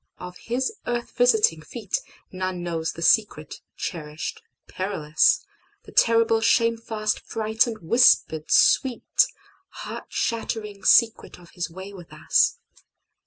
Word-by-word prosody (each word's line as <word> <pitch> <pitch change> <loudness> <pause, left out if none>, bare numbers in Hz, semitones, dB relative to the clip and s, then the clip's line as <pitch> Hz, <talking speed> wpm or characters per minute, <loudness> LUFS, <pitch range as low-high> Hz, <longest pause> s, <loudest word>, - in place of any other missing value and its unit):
Of 180 0 -9
His 260 - -2
earth 240 0 -3
visiting 220 -10 +2
feetNone 185 -3 -6
knows 165 -2 -3
the 170 - -7
secret, 165 -6 +1 0.2
cherished, 155 -2 -6 0.3
perilous, 185 - 0 0.4
The - - -14
terrible, 230 -1 +3
shamefast, 225 -2 0
frightened, 220 -1 -1
whispered, 165 -9 +3
sweet, 260 - +3 0.4
Heart - - -8
shattering 215 -3 -3
secret 230 -1 +3
of 175 -1 -18
His 175 0 -5
way 190 +4 -10
with 175 -4 -13
us. - - +1
215 Hz, 110 wpm, -24 LUFS, 175-230 Hz, 0.4 s, terrible